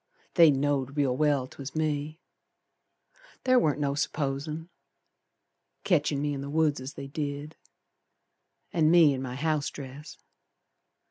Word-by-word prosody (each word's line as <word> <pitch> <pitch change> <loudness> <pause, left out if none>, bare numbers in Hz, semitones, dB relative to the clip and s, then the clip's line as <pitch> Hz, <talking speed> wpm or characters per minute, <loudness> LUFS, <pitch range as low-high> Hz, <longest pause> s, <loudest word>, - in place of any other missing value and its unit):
They 170 -3 +7
know'd 140 -1 0
real 135 -3 +2
well 145 -2 +2
'twas 135 +2 -9
me. 155 0 -2 1.3
Ther 255 -1 +5
warn't 150 - +1
no 140 -1 0
supposin', 145 +2 -2 1.2
Ketchin' 150 -5 +2
me 145 0 -1
in 135 - -4
the 140 - -6
woods 150 -2 +1
as 130 +3 -7
they 140 - -7
did, 145 +1 -5 1.2
An' 160 -3 +3
me 165 -4 +6
in 130 - -4
my 125 -1 -5
house 155 +1 0
dress. 140 +2 -10
145 Hz, 130 wpm, -28 LUFS, 140-155 Hz, 1.3 s, They